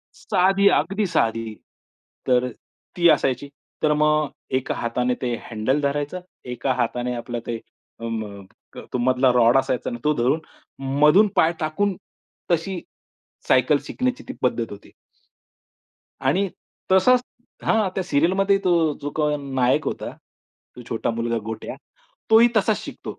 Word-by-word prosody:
साधी 195 Hz, +2 st, +2 dB
अगदी 195 Hz, +8 st, +1 dB
साधी, 115 Hz, -8 st, 0 dB, 0.7 s
तर 125 Hz, -1 st, +3 dB
अ, -, -, -6 dB, 0.5 s
ती 170 Hz, -1 st, +5 dB
असायची. 135 Hz, -2 st, +1 dB, 0.3 s
तर 150 Hz, -1 st, +4 dB
मग 150 Hz, 0 st, +2 dB, 0.3 s
एका 130 Hz, -, -3 dB
हाताने 125 Hz, +1 st, -1 dB
ते 120 Hz, -2 st, -1 dB, 0.2 s
हँडल 115 Hz, +6 st, 0 dB
धरायचं, 145 Hz, +5 st, -2 dB, 0.2 s
एका 125 Hz, +1 st, -1 dB
हाताने 125 Hz, 0 st, -1 dB
आपलं 120 Hz, 0 st, -4 dB
ते 115 Hz, -, -2 dB, 0.4 s
अ, 115 Hz, -, -10 dB
म 105 Hz, -3 st, -5 dB, 0.3 s
क -, -, -9 dB
मधला 130 Hz, +1 st, +3 dB
रॉड 120 Hz, +1 st, +5 dB
असायचा 130 Hz, -2 st, 0 dB
ना 120 Hz, -, -4 dB
तो 150 Hz, -, +3 dB
धरून 130 Hz, +6 st, +1 dB, 0.6 s
मधून 150 Hz, +9 st, +6 dB
पाय 170 Hz, -1 st, +4 dB
टाकून, 185 Hz, +6 st, 0 dB, 0.6 s
तशी 175 Hz, +2 st, 0 dB, 0.7 s
सायकल 130 Hz, +3 st, +4 dB
शिकण्याची 255 Hz, +2 st, -2 dB
ती 265 Hz, -, -5 dB
पद्धत 125 Hz, -2 st, +1 dB
होती. 100 Hz, 0 st, -11 dB, 1.3 s
आणि 165 Hz, +10 st, +1 dB, 0.4 s
तसाच 220 Hz, +7 st, +5 dB, 0.4 s
हां, 220 Hz, -3 st, +2 dB
त्या 190 Hz, -, -1 dB
सीरियलमध्ये 190 Hz, +6 st, +2 dB
तो 170 Hz, -4 st, +3 dB
जो 145 Hz, -, -3 dB
कोण 150 Hz, -2 st, 0 dB
नायक 125 Hz, -1 st, +2 dB
होता, -, -, -3 dB, 0.7 s
तो 125 Hz, -, -9 dB
छोटा 115 Hz, -, -1 dB
मुलगा 115 Hz, 0 st, -1 dB
गोट्या. 110 Hz, 0 st, -5 dB, 0.6 s
तोही 225 Hz, +2 st, +7 dB
तसाच 215 Hz, 0 st, +3 dB
शिकतो -, -, -8 dB
145 Hz, 135 wpm, -23 LUFS, 120-180 Hz, 1.3 s, तोही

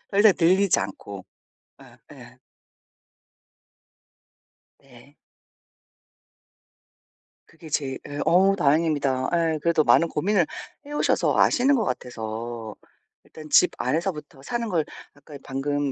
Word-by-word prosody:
더 200 Hz, -, -1 dB
이상 210 Hz, 0 st, +7 dB
늘리지 185 Hz, +3 st, +3 dB
않고. -, -, -7 dB, 0.6 s
어 -, -, -15 dB, 0.3 s
예. -, -, -16 dB, 2.4 s
네. -, -, -19 dB, 2.3 s
그게 160 Hz, -, -14 dB
제일 135 Hz, -3 st, -2 dB
예 145 Hz, 0 st, -7 dB
어 185 Hz, +5 st, +4 dB
다행입니다. 145 Hz, -5 st, +1 dB, 0.2 s
예. 155 Hz, -, -3 dB
그래도 165 Hz, 0 st, +2 dB
많은 170 Hz, -, +4 dB
고민을 175 Hz, +3 st, +1 dB, 0.4 s
해 290 Hz, -, -11 dB
오셔서 -, -, +1 dB
아시는 270 Hz, +3 st, +3 dB
것 235 Hz, -, 0 dB
같아서 115 Hz, -, -5 dB, 0.5 s
일단 155 Hz, -1 st, -13 dB
집 180 Hz, -, +5 dB
안에서부터 150 Hz, -5 st, -3 dB
사는 235 Hz, +6 st, -3 dB
걸 165 Hz, -6 st, 0 dB, 0.3 s
아까 145 Hz, 0 st, -13 dB
방금 145 Hz, +1 st, -2 dB
155 Hz, 215 characters per minute, -24 LUFS, 140-185 Hz, 2.4 s, 이상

